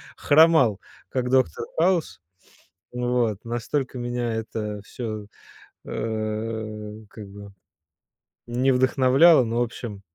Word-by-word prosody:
хромал, 155 - +4 0.3
как 125 -1 -2
доктор 130 - +1
Хаус. 175 - +1 0.7
Вот, 120 -4 -1
настолько 125 +3 -3
меня 120 -1 -2
это 110 -2 -4
всё, 110 -4 -6 0.6
э, 110 -1 -4
как 105 -3 -10
бы 100 0 -11 1.0
не 125 +3 +1
вдохновляло, 130 +4 +5
но 115 +1 -1
в - - +2
общем 115 -3 -7
120 Hz, 100 wpm, -24 LUFS, 110-130 Hz, 1.0 s, вдохновляло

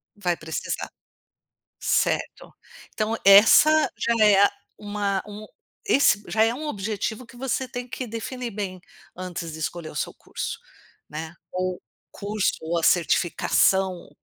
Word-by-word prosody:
Vai 180 -4 -1
precisar, 160 0 -4 0.9
certo. - - -1 0.4
Então 215 +1 -1
essa 225 +10 +7
já 230 -2 +2
é, 200 -2 +6
ah, 200 - +5 0.3
uma 205 -2 -2
um 210 +1 -9 0.4
esse 280 - +4
já 220 - +2
é 225 +1 +2
um 305 +5 -5
objetivo 215 0 -3
que 235 - -16
você 260 +1 -2
tem 245 +1 -6
que 255 +1 -5
definir 235 +2 -5
bem 195 -3 -5 0.3
antes 175 -3 -6
de 160 - -8
escolher 160 +1 -4
o - - -12
seu - - -3
curso, - - -6 0.5
né, 160 +2 -6 0.2
ou 185 0 -3 0.3
curso 205 0 -1
ou 165 +2 -2
a 165 - -2
certificação, 180 +2 +2
205 Hz, 140 wpm, -24 LUFS, 180-230 Hz, 0.9 s, essa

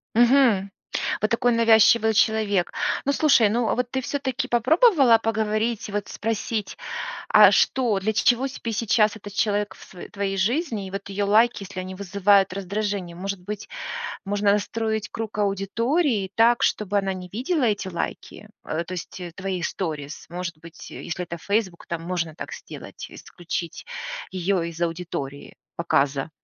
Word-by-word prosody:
Мгм. 235 -5 +4 0.5
Вот 215 - 0
такой 240 +1 +2
навязчивый 225 -1 +5
человек. 215 -4 +2 0.3
Ну, 280 - +2
слушай, 275 -8 +5
ну, 235 +1 +1
а - - +2
вот 250 0 -2
ты 265 - -1
всё-таки 265 -1 -2
попробовала 270 - +5
поговорить 220 0 -1
и 205 - -8
вот 205 -1 -2
спросить: 220 -1 -3 0.5
"А - - +8
что, 240 -7 +2
для 215 +3 0
чего 240 +4 +3
сейчас 225 -4 +1
этот 205 -1 -10
человек 205 0 0
в - - -17
сво 180 - -12
твоей 195 -1 -2
жизни 225 - 0
и - - -8
вот 200 +1 -6
её 200 +1 -1
лайки, 220 +1 +3
если 185 -1 -6
они 185 +1 -6
вызывают 200 0 +3
раздражение?" 195 -2 -3
Может 195 +1 -4
быть, 205 +3 -7 0.6
можно 205 0 +2
настроить 220 0 -1
круг 220 -2 -5
аудитории 205 - 0
так, 235 +1 +4
чтобы 205 -1 +1
она 195 -1 0
не 180 -1 -8
видела 265 - -1
эти 205 -4 0
лайки? 185 +4 -5 0.2
Э, 160 +2 -2
то 180 +2 -8
есть, 180 +1 -7
э, 175 -1 -6
твои 185 -1 -3
сторис. 155 -5 -4
Может 175 -2 -5
быть, 165 +1 -12
если 175 +2 -5
это 170 0 -6
"Фейсбук", 200 -1 -2
там 170 -1 -4
можно 170 -3 -3
так - - -7
сделать: 485 - -9
исключить 170 -1 -6 0.5
её 185 0 0
из 170 0 -6
аудитории 165 -5 -4 0.2
показа. 140 -3 +1
205 Hz, 155 wpm, -24 LUFS, 185-225 Hz, 0.6 s, А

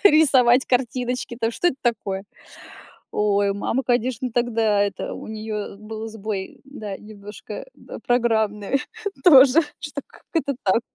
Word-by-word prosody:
рисовать 265 -7 +6
картиночки. 250 -1 -1
А 230 - -4
то - - 0
что 355 - -1
это 265 - -3
такое? 205 -5 -1 0.9
Ой, 200 -1 +2
мама, 230 +6 -1
конечно, 245 0 0
тогда 225 -3 +2
это 200 -2 -2
у - - -8
нее 215 -2 -5
был 220 +1 -7
сбой, 210 -3 -5
да, 215 -8 -7
немножко 210 -1 -9 0.4
программный 225 0 +1 0.4
тоже. 280 -2 +8 0.2
Что 295 -1 -5
как - - -19
это 285 -5 0
так? 205 +4 +3
225 Hz, 130 wpm, -23 LUFS, 210-255 Hz, 0.9 s, тоже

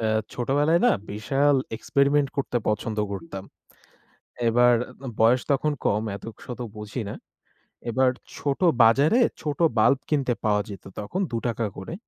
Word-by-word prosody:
আ - - +1 0.3
ছোটবেলায় 145 +7 +2
না - - +6 0.2
বিশাল 135 +7 +2 0.2
এক্সপেরিমেন্ট 140 +3 +2
করতে 135 -3 -1
পছন্দ 105 +1 -1
করতাম। 95 +1 -7 1.0
এবার 120 +1 +5 0.5
বয়স 120 +3 +5
তখন 150 +2 +1
কম 105 +1 +2
এত 100 - -14 0.2
শত 125 -1 -7 0.2
বুঝি 105 +3 -5
না। - - -5 0.8
এবার 130 +2 +3 0.3
ছোট 140 -2 -2 0.2
বাজারে 140 - +5 0.2
ছোট 150 -2 -3 0.2
বাল্ব 135 +5 +5
কিনতে 135 -5 +1
পাওয়া 105 -1 +2
যেত 100 -2 -9 0.2
তখন 175 - -4
২ 115 - -1
টাকা 115 -1 -1
করে। 95 +12 -6
125 Hz, 140 wpm, -25 LUFS, 110-140 Hz, 1.0 s, না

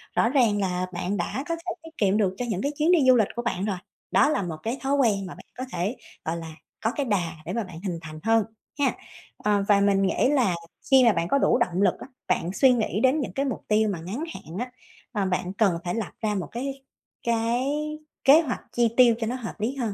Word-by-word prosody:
Rõ 230 - +3
ràng 235 -6 +3
là 185 -2 0
bạn 185 +3 -2
đã 225 +9 -2
có 335 - +1
thể 335 +2 -5
tiết 325 0 -13
kiệm 200 -1 +2
được 195 -4 +2
cho 245 - -2
những 195 -4 -1
cái 285 - 0
chuyến 310 +3 +3
đi 355 - +6
du 255 - +8
lịch 220 -4 +3
của 240 - -2
bạn 200 -5 -2
rồi, 200 -3 -1 0.3
đó 290 - +5
là 255 - +1
một 165 -3 -4
cái 235 +4 -2
thói 275 +1 0
quen 215 -8 +2
mà 180 - -7
bạn - - -14
có 255 - -3
thể, 195 +8 -1 0.3
gọi 160 +1 -1
là, 165 -1 -7 0.3
có 225 - +2
cái 285 - -1
đà 190 -8 0
để - - -4
mà 230 - -1
bạn 175 -4 -10
hình 175 -3 -2
thành 155 -1 -9
hơn 225 0 +4 0.4
hén. 280 -2 +3 0.4
Ờ, 205 -1 +1
và 205 -1 +5
mình 200 -1 +3
nghĩ 250 - +2
là 250 -11 +2 0.4
khi 265 -1 +8
mà 230 -3 +6
bạn 170 -1 -1
có 280 - +3
đủ 270 - +3
động 185 -6 0
lực 195 -3 +4
á, - - -9 0.2
bạn 175 +3 0
suy 265 +5 +5
nghĩ 220 -3 0
đến 260 +6 +3
những 220 -11 -3
cái 275 +6 0
mục 260 -5 -3
tiêu 215 0 +3
mà 190 -5 -3
ngắn 200 - -4
hạn 165 +4 -9
á, 250 +1 -4 0.4
ờ, 205 -5 -1
bạn 180 0 -1
cần 195 -4 +2
phải 175 -1 -2
lập 225 - -3
ra 215 -2 0
một 190 - -3
cái 270 +3 -5 0.4
cái 235 +2 +1 0.6
kế 290 +4 +8
hoạch 275 -7 -3
chi 235 -1 +2
tiêu 245 -3 +7
cho 225 - -1
nó 245 - -2
hợp 245 -3 -5
lý 230 +6 -1
hơn. 235 -6 -2
220 Hz, 255 wpm, -25 LUFS, 190-255 Hz, 0.6 s, du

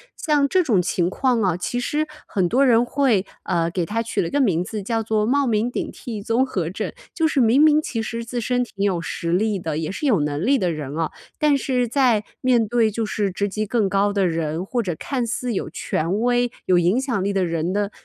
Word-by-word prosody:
像 295 -2 +2
这 370 +5 +2
种 220 - +2
情 175 -1 0
况 250 +1 +1
啊， 185 -4 +1
其 245 +7 -2
实 305 +4 -1 0.2
很 190 -4 0
多 265 +9 +3
人 235 -1 +4
会 245 -7 +1 0.2
呃， 170 -2 0
给 175 -2 -1
它 225 +6 -1
取 230 - -1
了 165 - -2
个 285 - 0
名 180 -10 +2
字 210 +2 -5
叫 225 +2 -1
做 215 -1 +1
冒 275 +4 +2
名 225 0 +1
顶 - - -4
替 220 -4 -7
综 230 +5 +1
合 180 -10 -2
症。 185 - -4 0.2
就 325 -2 +2
是 285 -3 +1
明 240 +5 +4
明 305 0 +5
其 230 -6 -3
实 230 +1 -4
自 240 +1 -4
身 250 +2 0
挺 200 -4 -3
有 185 -4 0
实 170 0 -3
力 205 +1 +1
的， 160 -3 -3
也 160 +1 -2
是 295 - -4
有 210 - +3
能 150 +5 -1
力 275 +2 +4
的 180 -6 0
人 150 -2 -5
啊， 165 -1 -1 0.3
但 295 -2 +3
是 250 -3 0
在 245 -6 +3 0.2
面 245 -3 +3
对 230 -2 +3
就 220 +1 -2
是 210 -2 -1
职 200 +2 -1
级 215 +2 -2
更 210 -3 +1
高 200 +1 +1
的 200 -2 +2
人， 165 +1 -2
或 240 +3 -1
者 180 -6 -3
看 255 -4 -2
似 245 +1 -2
有 190 - -3
权 170 +6 -2
威、 245 0 +2
有 180 -1 +4
影 180 +8 +2
响 240 -8 -1
力 200 - 0
的 190 -2 +1
人 165 +1 -1
的 205 0 -1
215 Hz, 255 characters per minute, -22 LUFS, 185-245 Hz, 0.3 s, 明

